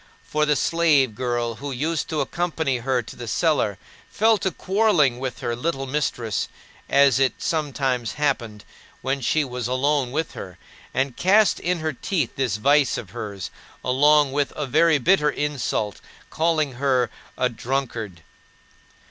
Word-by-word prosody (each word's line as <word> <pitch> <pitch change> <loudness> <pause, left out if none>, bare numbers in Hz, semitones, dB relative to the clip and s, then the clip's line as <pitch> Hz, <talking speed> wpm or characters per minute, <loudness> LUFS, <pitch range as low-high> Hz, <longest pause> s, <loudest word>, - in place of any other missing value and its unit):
For 150 0 0
the 150 - +3
slave 150 -5 +3
girl 120 -1 -2
who 140 0 -4
used 155 +5 -2
to 155 -2 0
accompany 160 -6 -1
her 125 0 0
to - - -11
the 120 - -8
cellar 110 - +1 0.3
fell 220 0 +3
to 190 - 0
quarreling 180 - +2
with 130 -2 -5
her 120 0 -2
little 135 +1 -2
mistress, 130 -6 -1 0.4
as 140 -2 +5
it 135 -2 +2
sometimes 135 -6 -1
happened 120 -8 -2 0.4
when 135 +1 -1
she 155 +5 +2
was 125 -2 -4
alone 130 0 +1
with 160 +4 -2
her, 90 -3 -9 0.3
and 130 -1 -1
cast 205 +3 +4
in 175 -1 -1
her 155 -1 -1
teeth 145 - -2
this 125 -6 0
vice 140 +4 +3
of 100 -6 -7
hers, 105 -4 -6 0.3
along 145 +2 +4
with 145 0 0
a 150 - -2
very 155 +4 +4
bitter 150 +1 +3
insult: 140 -8 -2 0.3
calling 155 -3 +1
her 130 -4 +2 0.3
"a 125 - +2
drunkard." 115 -7 -4
135 Hz, 150 wpm, -23 LUFS, 120-155 Hz, 0.4 s, as